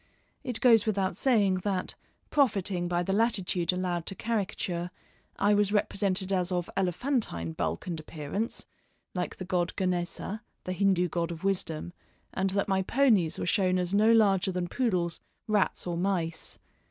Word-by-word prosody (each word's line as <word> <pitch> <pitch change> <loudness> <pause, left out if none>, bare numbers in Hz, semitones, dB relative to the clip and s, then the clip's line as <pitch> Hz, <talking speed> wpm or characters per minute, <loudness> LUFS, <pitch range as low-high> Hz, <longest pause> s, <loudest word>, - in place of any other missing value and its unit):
It 245 -3 -2
goes 225 -4 +6
without 195 -3 0
saying 205 -8 +3
that, 195 -3 -1 0.4
profiting 195 -10 +2
by 175 0 0
the 195 - -1
latitude 195 -5 +1
allowed 180 -2 -2
to 195 - -3
caricature, 190 -5 -2 0.5
I 205 +1 +3
was 205 -1 +3
represented 195 -2 0
as 180 -1 +1
of 175 -1 -2
elephantine 190 - 0
bulk 80 0 -2
and 170 -3 -3
appearance, 155 +8 -4 0.5
like 180 -1 -3
the 185 - -7
god 180 -1 -1
Ganesa, 185 +3 -2 0.2
the 185 - -3
Hindoo 185 -2 +2
god 170 0 -2
of 170 +1 -7
wisdom, 175 -4 -1 0.4
and 190 0 0
that 200 +1 +1
my 190 -1 +2
ponies 210 - +3
were - - -2
shown 185 0 +2
as 180 +1 -1
no 215 +2 +5
larger 195 -4 +4
than 180 -1 -2
poodles, 180 -6 0 0.3
rats, 210 -2 +1
or 175 -1 -2
mice. 170 -3 -1
185 Hz, 155 wpm, -29 LUFS, 175-205 Hz, 0.5 s, goes